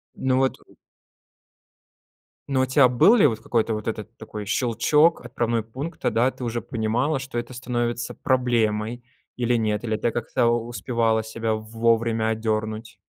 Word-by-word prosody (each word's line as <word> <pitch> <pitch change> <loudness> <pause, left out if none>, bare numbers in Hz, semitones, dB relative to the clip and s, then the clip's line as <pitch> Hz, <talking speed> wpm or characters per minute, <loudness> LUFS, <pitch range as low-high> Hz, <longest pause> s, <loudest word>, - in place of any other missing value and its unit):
Ну, 130 -1 +1
вот, 130 0 +1
э - - -20 1.8
Ну, 130 -1 +2
у - - +3
тя 130 0 +5
был 125 - +5
ли 200 -11 +6
вот 110 -3 -3
какой-то 115 -1 0
вот 105 - -6
этот 110 0 -5
такой 105 -1 -8
щелчок, 135 +9 +2
отправной 120 -1 -1
пункт, 135 +9 -7
тогда 125 +3 +2
ты - - -9
уже 120 0 -2
понимала, 120 +5 -1
что 130 -2 -6
это 120 +2 -4
становится 120 -1 -3
проблемой 120 -2 0 0.3
или 120 0 +1
нет, 110 -2 0
или 110 -2 -1
ты 120 - 0
как-то 120 +1 0
успевала 115 -1 0
себя 110 0 -2
вовремя 115 +1 0
одернуть? 110 0 -2
115 Hz, 150 wpm, -24 LUFS, 110-125 Hz, 1.8 s, ли